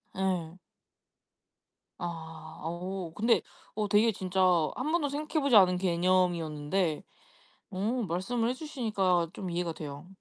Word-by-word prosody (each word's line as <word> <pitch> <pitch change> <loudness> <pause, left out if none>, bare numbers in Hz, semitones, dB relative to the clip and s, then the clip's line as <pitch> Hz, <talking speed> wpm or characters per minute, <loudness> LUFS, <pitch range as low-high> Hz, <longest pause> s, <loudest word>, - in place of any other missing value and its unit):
예. 185 -3 -1 1.4
아 165 -2 -7
어 175 +1 -4
근데 230 +3 +3 0.3
어 210 -1 0
되게 210 +3 +4
진짜 190 -2 -2 0.3
1 275 +5 -2
번도 320 -4 +1
생각해보지 290 -2 +1
않은 185 -3 +7
개념이었는데 175 -2 +1 0.7
어 185 0 -4 0.3
말씀을 225 +7 0
해주시니까 215 - 0
좀 185 - -5
이해가 170 -1 -1
돼요. 145 +2 -8
185 Hz, 235 characters per minute, -30 LUFS, 170-220 Hz, 1.4 s, 않은